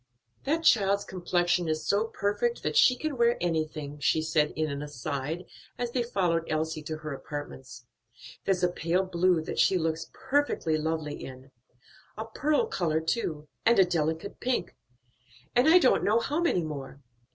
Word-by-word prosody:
"That 320 +4 0
child's 200 -6 +4
complexion 175 -2 0
is 155 0 -2
so 205 +2 +2
perfect, 225 - -1
that - - -1
she 265 - +6
can 300 +1 -4
wear 235 0 +4
anything," 155 -3 -2
she 155 +2 +2
added 150 -1 +3
in 155 0 0
an 140 0 -4
aside, 145 +4 -4 0.3
as 245 -1 -2
they 245 - 0
followed 180 -8 0
Elsie 155 0 -1
to 155 +1 -5
her 155 -1 -6
apartments; 135 -3 -8 0.6
"there's 185 -2 0
a - - +6
pale 175 +2 0
blue 180 -2 +2
that - - -4
she 190 - +4
looks 160 -1 -2
perfectly 265 - 0
lovely 155 -1 -3
in; 130 0 -10 0.7
a 220 - -4
pearl 295 - +1
color 170 - 0
too, 160 -3 -2 0.2
and 235 0 +4
a 190 - +7
delicate 160 +2 -2
pink, 255 0 -1 0.8
and 245 +5 +5
I 345 - +8
don't 270 -8 +4
know 215 +2 +3
how 290 +7 -1
many 185 - +2
more. 140 -3 -6
175 Hz, 165 wpm, -28 LUFS, 155-225 Hz, 0.8 s, I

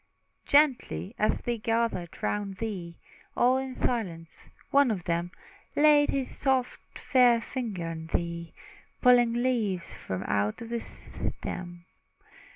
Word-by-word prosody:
Gently 280 -7 +2
as 215 - +1
they 240 -1 -2
gathered 225 -6 -1
round 200 -2 -2
thee, 185 -7 -5 0.4
All 255 +2 +4
in 265 -1 -5
silence, 175 -12 -3 0.2
one 280 -2 +5
of 195 -6 -2
them 170 +1 -1 0.5
Laid 295 -1 +5
his 270 -2 -2
soft, 265 -2 -1
fair 245 -3 +4
fingers 225 -8 -4
on 160 0 -7
thee, 170 0 -3 0.5
Pulling 245 -2 +6
leaves 235 -7 0
from 95 0 -5
out 100 +1 0
the 230 0 -4
stem. 175 -5 -6
225 Hz, 120 wpm, -28 LUFS, 175-250 Hz, 0.5 s, Pulling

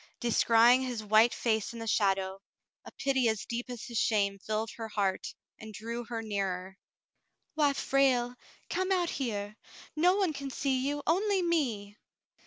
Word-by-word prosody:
Descrying 235 +1 +4
his 245 -4 -3
white 215 +3 +5
face 220 +1 -1
in - - -8
the 225 - -6
shadow, 195 -3 0 0.4
a - - -10
pity 265 -4 +1
as 220 -2 -2
deep 240 +2 -4
as 245 -2 -6
his 235 -2 -3
shame 200 -3 +1
filled 215 +2 -3
her 225 -1 -5
heart 200 -3 -2 0.2
and 220 -1 -10
drew 235 +2 -5
her 230 -1 -5
nearer. 190 -2 -3 0.7
"Why, 295 -2 +2
Frale, 260 -3 +2 0.3
come 375 +1 -1
out 355 -3 +1
here. 210 -5 -4 0.4
No 355 +4 +4
one 385 -5 +1
can 275 -1 -5
see 265 0 -1
you, 290 0 -2
only 385 +3 +2
me.' 235 -12 -1
235 Hz, 160 wpm, -30 LUFS, 210-275 Hz, 0.7 s, white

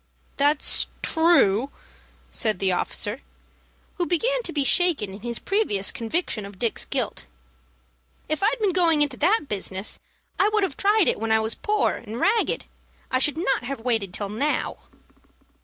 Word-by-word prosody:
"That's 290 +1 +3 0.2
true," 285 - +4 0.6
said 215 -5 -1
the 190 0 +1
officer, 205 +6 -2 0.8
who 350 - 0
began - - +1
to 355 - -5
be 290 -3 0
shaken 290 - +2
in 200 - -9
his 235 0 -3
previous 360 - 0
conviction 230 - -1
of 200 -1 -10
Dick's 230 +2 -1
guilt. - - -3 1.0
"If 310 +3 -2
I'd 440 +5 +2
been 410 -4 +1
going 330 -4 +4
into 280 -4 -3
that 395 +9 +3
business, 195 -2 -3 0.4
I 405 - +4
would 425 -1 +1
have 360 -7 -1
tried 410 0 +3
it - - +2
when 225 0 -2
I 220 - +4
was 220 +1 -1
poor 425 0 0
and 230 +1 -8
ragged. 440 - +1 0.5
I 255 - +2
should 295 +3 +2
not 270 -7 0
have 270 -2 -5
waited 225 -6 -1
till 200 +2 -3
now." 275 +9 -1
280 Hz, 160 wpm, -24 LUFS, 220-360 Hz, 1.0 s, true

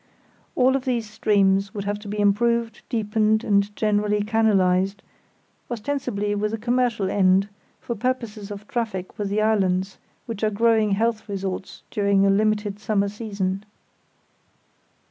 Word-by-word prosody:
All 260 +1 +4
of 270 0 -2
these 240 -4 -1
streams 200 -2 +2
would 200 - -3
have 205 +1 -2
to 210 - -11
be 210 +1 -4
improved, 230 +2 +1
deepened, 220 -1 +1
and 200 0 +1
generally 210 -1 +1
canalised; 195 -3 +2 0.7
ostensibly 230 -4 -2
with 210 +1 -1
a - - -6
commercial 235 -4 0
end, 190 0 +3 0.3
for 235 - -4
purposes 230 -3 -3
of 205 0 -8
traffic 215 -7 -4
with 205 -1 -1
the 210 +2 +1
islands, 190 -3 +1 0.3
which 225 -2 -6
are 215 - +3
growing 220 -1 +2
health 225 +1 0
resorts 190 -1 -5
during 200 -1 +2
a 195 - +4
limited 210 0 +1
summer 200 -1 0
season. 200 -2 -3
210 Hz, 140 wpm, -23 LUFS, 200-225 Hz, 0.7 s, All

